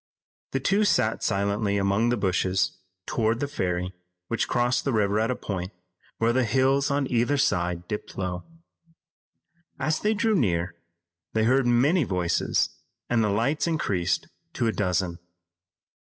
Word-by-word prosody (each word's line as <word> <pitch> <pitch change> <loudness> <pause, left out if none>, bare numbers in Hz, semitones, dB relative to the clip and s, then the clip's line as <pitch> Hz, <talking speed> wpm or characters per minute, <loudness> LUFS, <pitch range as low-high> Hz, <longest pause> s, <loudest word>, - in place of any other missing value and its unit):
The 135 - -1
two 195 +10 +2
went 110 +1 0
silently 100 0 0
among 100 +4 +2
the 120 - +1
bushes 95 -1 +1 0.3
toward 115 0 0
the 145 - -1
ferry 90 -7 -2 0.4
which 115 - 0
crossed 120 +1 +1
the 135 - 0
river 105 -2 +2
at 110 +2 +1
a 125 - 0
point 95 -4 -4 0.5
where 115 +1 +2
the 130 +1 +2
hills 135 +3 +2
on 140 0 +1
either 120 +4 +2
side 90 -9 0
dipped 105 - -6
low. 90 -2 -3 1.4
As 155 +3 0
they 215 +1 +1
drew 220 +1 +2
near, 90 - +1 0.6
they 110 - +2
heard 130 +2 +3
many 140 +9 +3
voices 90 -6 0 0.4
and 115 -2 +3
the 105 - +1
lights 135 +10 +1
increased 100 - 0 0.3
to 120 - -1
a 115 - +2
dozen. 90 -3 -1
110 Hz, 150 wpm, -26 LUFS, 95-130 Hz, 1.4 s, heard